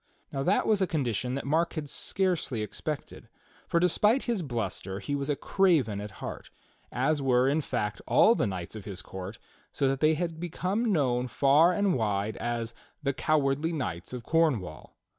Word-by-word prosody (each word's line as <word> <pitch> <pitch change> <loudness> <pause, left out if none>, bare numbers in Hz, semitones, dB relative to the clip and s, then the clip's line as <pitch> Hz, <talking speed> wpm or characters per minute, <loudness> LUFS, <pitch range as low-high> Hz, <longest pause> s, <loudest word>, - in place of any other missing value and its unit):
Now 135 - -2
that 185 +9 +2
was 210 -3 +2
a 190 - +3
condition 125 - -1
that 140 - -4
Mark 160 +4 +1
had 155 -3 -4
scarcely 170 - -1
expected, 105 - -6 0.4
for 170 - +2
despite 210 +8 +3
his 235 -6 -1
bluster 100 - -3
he 105 +8 -4
was 140 0 -2
a 145 - +2
craven 150 - +2
at 105 - -6
heart, - - -7 0.4
as 145 +4 +1
were, 130 -1 +3
in 145 +3 +2
fact, 105 -7 -3
all 225 - +6
the 125 - 0
knights 95 0 -5
of 105 - -8
his 95 -3 -6
court, 95 +3 -7 0.3
so 140 - +1
that 135 0 0
they 155 +1 +4
had 165 0 -3
become 185 +6 -1
known 125 -7 +1
far 140 +8 +4
and 200 0 +2
wide 105 -3 0
as 120 -1 -3 0.3
"the 140 -1 +1
cowardly 150 +2 +1
knights 95 - -4
of 125 -2 -6
Cornwall." 125 - 0
140 Hz, 180 wpm, -28 LUFS, 115-165 Hz, 0.4 s, all